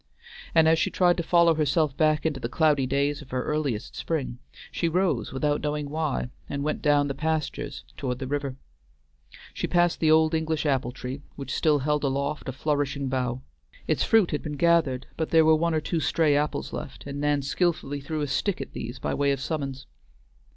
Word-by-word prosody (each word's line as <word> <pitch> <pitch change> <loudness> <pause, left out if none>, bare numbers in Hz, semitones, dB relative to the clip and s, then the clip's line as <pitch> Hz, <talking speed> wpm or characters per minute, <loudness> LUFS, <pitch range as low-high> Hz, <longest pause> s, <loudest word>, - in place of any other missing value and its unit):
And 160 -1 +6
as 160 0 +4
she - - +1
tried 175 -1 +3
to - - 0
follow 170 0 +4
herself 150 -1 +1
back 155 0 +2
into 150 -4 0
the 120 - -4
cloudy 145 -2 +2
days 140 +2 0
of 140 - -13
her 125 0 -2
earliest 140 -8 -2
spring, 135 -7 -3 0.3
she 170 - 0
rose 180 +2 0
without 145 +2 0
knowing 150 -1 -2
why, 155 -5 -1 0.2
and 140 0 -3
went 155 +1 -2
down 145 -1 +3
the 140 - -2
pastures 155 +1 -3
toward 125 -2 -2
the 130 - -5
river. 140 -1 -2 1.0
She - - -2
passed 175 -1 +2
the 160 - +3
old 160 +1 +5
English 160 -1 0
apple 130 -4 +1
tree, 130 +3 -6
which 135 -2 -5
still 155 -3 +3
held 150 +2 0
aloft 140 +1 -1
a - - -1
flourishing 140 0 -1
bough. 130 -1 -2 0.4
Its - - +1
fruit 220 -5 +4
had 150 - -1
been 150 -2 -5
gathered, 160 -6 +2
but 160 - -1
there 160 -1 +5
were 160 - +6
one 165 +1 +1
or 155 - +1
two 165 +2 -1
stray 155 -1 +2
apples 150 +1 -1
left, 135 - -7
and 140 0 -5
Nan 145 -1 +1
skillfully 145 -1 -1
threw 155 +2 -3
a 145 - -1
stick 195 +7 -1
at 135 - -7
these 120 +3 -6
by - - -2
way 140 0 +2
of 140 - -1
summons. 135 -3 -4
145 Hz, 200 wpm, -26 LUFS, 135-160 Hz, 1.0 s, And